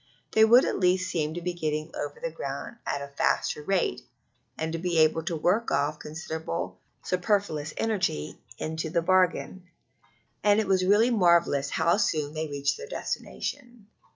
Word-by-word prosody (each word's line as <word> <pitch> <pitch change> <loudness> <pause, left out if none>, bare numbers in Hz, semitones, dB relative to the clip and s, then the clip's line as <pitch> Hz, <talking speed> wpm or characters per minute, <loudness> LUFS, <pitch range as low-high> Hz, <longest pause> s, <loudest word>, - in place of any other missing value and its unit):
They 220 - +5
would 240 +4 +7
at - - -1
least 185 0 +2
seem 155 -1 -1
to 175 - -4
be 180 0 -1
getting 155 -1 -3
over 470 - -5
the - - -3
ground 360 - -6
at 140 - -2
a - - -6
faster 150 - +1
rate, 185 +4 0 0.6
and 160 +1 -3
be 175 -2 0
able 160 0 +4
to 170 - -1
work 185 +9 +1
off 145 +2 0
considerable 160 - -5 0.2
superfluous 180 -5 0
energy 190 - -1 0.2
into 160 +1 -3
the 170 +1 0
bargain. 185 0 +1 0.7
And 205 0 +5
it 220 - +1
was 190 -1 +2
really 210 +6 +4
marvellous 170 - +3
how 170 +6 +2
soon 155 -8 0
they 160 0 -3
reached 140 -1 -1
their - - -8
destination. 240 -4 -5
170 Hz, 160 wpm, -27 LUFS, 155-195 Hz, 0.7 s, would